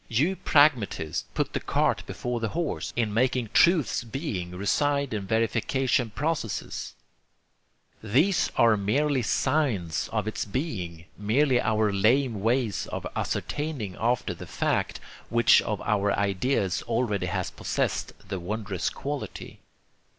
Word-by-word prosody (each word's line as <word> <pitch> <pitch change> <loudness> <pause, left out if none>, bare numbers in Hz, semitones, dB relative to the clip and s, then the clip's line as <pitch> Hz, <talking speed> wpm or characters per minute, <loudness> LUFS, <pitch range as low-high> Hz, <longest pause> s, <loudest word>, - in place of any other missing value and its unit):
You 150 - +1
pragmatists 120 - +2
put - - -1
the - - 0
cart - - +1
before 125 -1 -3
the 115 - -1
horse 170 -4 -2
in 110 -3 0
making 125 0 +1
truth's 170 -8 +4
being 115 - -4
reside 140 +9 0
in 100 -3 -3
verification 120 +3 +1
processes. 145 -2 -3 1.1
These 150 - +2
are 115 -2 +6
merely 130 +7 +1
signs 120 - 0
of 110 -2 -1
its 110 - -2
being, 95 - -4
merely 125 +5 +3
our 110 -1 +1
lame 110 +2 +2
ways 115 -2 0
of - - -5
ascertaining 145 - -3
after 120 +1 0
the - - -10
fact, - - -1 0.3
which 120 -1 +5
of 105 -2 -3
our 105 -1 +1
ideas 100 -1 0
already 115 -3 0
has - - -2
possessed - - -2
the 95 -1 -3
wondrous 100 0 -2
quality. 145 0 -6
115 Hz, 125 wpm, -27 LUFS, 100-135 Hz, 1.1 s, are